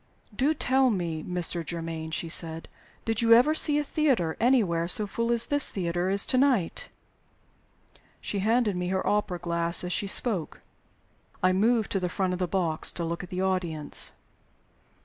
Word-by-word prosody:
"Do 290 Hz, +8 st, +1 dB
tell 265 Hz, -1 st, +2 dB
me, 170 Hz, -7 st, -2 dB
Mr. 175 Hz, 0 st, -2 dB
Germaine," 165 Hz, -1 st, -5 dB
she 165 Hz, +1 st, -3 dB
said. 165 Hz, 0 st, -2 dB, 0.4 s
"Did 225 Hz, 0 st, -1 dB
you 230 Hz, 0 st, +5 dB
ever 250 Hz, +7 st, +5 dB
see 300 Hz, -1 st, +2 dB
a 295 Hz, -, +1 dB
theater 265 Hz, -, 0 dB
anywhere 205 Hz, -10 st, +2 dB
so 210 Hz, +4 st, 0 dB
full 230 Hz, +4 st, -2 dB
as 235 Hz, -1 st, +3 dB
this 290 Hz, -1 st, +2 dB
theater 175 Hz, -1 st, -2 dB
is 200 Hz, +1 st, +1 dB
to 255 Hz, -, +1 dB
night?" 255 Hz, -11 st, +1 dB, 1.3 s
She 200 Hz, -, -3 dB
handed 220 Hz, 0 st, +1 dB
me 180 Hz, 0 st, -2 dB
her 190 Hz, +1 st, -1 dB
opera 205 Hz, -3 st, 0 dB
glass 170 Hz, 0 st, +1 dB
as 180 Hz, 0 st, -2 dB
she 200 Hz, -, -1 dB
spoke. 195 Hz, -4 st, -1 dB, 0.8 s
I 185 Hz, 0 st, +4 dB
moved 220 Hz, +3 st, +1 dB
to 195 Hz, -, +1 dB
the 180 Hz, -1 st, -2 dB
front 185 Hz, 0 st, -1 dB
of 180 Hz, -, -4 dB
the 180 Hz, -, -1 dB
box 170 Hz, -3 st, 0 dB
to 170 Hz, -, -4 dB
look 170 Hz, +1 st, -4 dB
at 180 Hz, -, -10 dB
the 185 Hz, 0 st, -3 dB
audience. 175 Hz, -5 st, 0 dB
185 Hz, 175 wpm, -27 LUFS, 170-230 Hz, 1.3 s, you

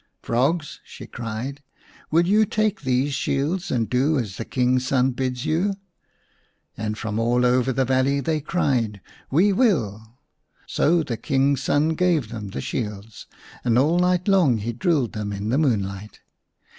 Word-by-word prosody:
"Frogs!" 145 Hz, +7 st, 0 dB
she -, -, -11 dB
cried, 120 Hz, +5 st, -6 dB, 0.5 s
"will 165 Hz, +2 st, +3 dB
you 210 Hz, +4 st, +4 dB
take 215 Hz, 0 st, 0 dB
these 130 Hz, +1 st, 0 dB
shields 150 Hz, +7 st, -1 dB
and 115 Hz, -3 st, 0 dB
do 140 Hz, +5 st, +1 dB
as 105 Hz, -7 st, -3 dB
the 115 Hz, -, -5 dB
King's 130 Hz, 0 st, +1 dB
son 130 Hz, 0 st, +2 dB
bids 125 Hz, -1 st, -3 dB
you? 185 Hz, +6 st, 0 dB, 0.5 s
" -, -, -42 dB
And 105 Hz, 0 st, -4 dB
from 110 Hz, 0 st, -3 dB
all 120 Hz, +2 st, +2 dB
over 125 Hz, +1 st, +2 dB
the 130 Hz, +1 st, +1 dB
valley 130 Hz, +2 st, +2 dB
they 155 Hz, +3 st, -1 dB
cried, 125 Hz, -, 0 dB, 0.2 s
" -, -, -27 dB
We 200 Hz, +2 st, +4 dB
will! 115 Hz, -, 0 dB, 0.2 s
" -, -, -50 dB, 0.2 s
So 165 Hz, +2 st, +2 dB
the 120 Hz, -5 st, -4 dB
King's 135 Hz, +3 st, +1 dB
son 145 Hz, +3 st, +2 dB
gave 160 Hz, -7 st, +1 dB
them 110 Hz, -3 st, -6 dB
the 95 Hz, -, -5 dB
shields, 105 Hz, -2 st, -5 dB, 0.4 s
and 120 Hz, -1 st, +2 dB
all 155 Hz, +7 st, +3 dB
night 180 Hz, +1 st, +1 dB
long 180 Hz, -, +4 dB
he 115 Hz, +3 st, -3 dB
drilled 155 Hz, -, 0 dB
them 105 Hz, -1 st, -4 dB
in 100 Hz, +1 st, -4 dB
the 130 Hz, +5 st, +2 dB
moonlight. 105 Hz, -7 st, -2 dB
130 Hz, 170 wpm, -23 LUFS, 115-160 Hz, 0.5 s, you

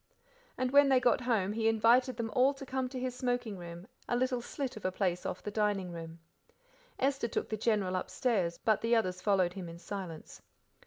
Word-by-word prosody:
And 255 Hz, 0 st, 0 dB
when 285 Hz, 0 st, +6 dB
they 265 Hz, -1 st, +5 dB
got 245 Hz, 0 st, +3 dB
home 215 Hz, -5 st, +1 dB
he 225 Hz, 0 st, 0 dB
invited 230 Hz, +3 st, +4 dB
them 225 Hz, -1 st, -3 dB
all 265 Hz, +2 st, +4 dB
to 275 Hz, -, -8 dB
come 260 Hz, 0 st, -2 dB
into 255 Hz, +1 st, -6 dB
his 255 Hz, 0 st, -2 dB
smoking 245 Hz, -4 st, -2 dB
room, 175 Hz, 0 st, -9 dB, 0.2 s
a -, -, +2 dB
little 250 Hz, 0 st, 0 dB
slit 260 Hz, +2 st, -4 dB
of 215 Hz, -, -9 dB
a 185 Hz, -, 0 dB
place 180 Hz, -2 st, -1 dB
off -, -, -5 dB
the 210 Hz, -, -4 dB
dining 205 Hz, -4 st, 0 dB
room. 165 Hz, -1 st, -8 dB, 0.8 s
Esther 270 Hz, -2 st, +1 dB
took 230 Hz, -, -3 dB
the 220 Hz, -, -1 dB
General 205 Hz, -4 st, +1 dB
upstairs, 185 Hz, -2 st, 0 dB
but 220 Hz, -3 st, +1 dB
the 230 Hz, +1 st, +3 dB
others 185 Hz, -5 st, 0 dB
followed 185 Hz, -4 st, +2 dB
him 180 Hz, -3 st, -6 dB
in 165 Hz, -, -9 dB
silence. 175 Hz, -2 st, -7 dB
220 Hz, 205 wpm, -32 LUFS, 185-250 Hz, 0.8 s, when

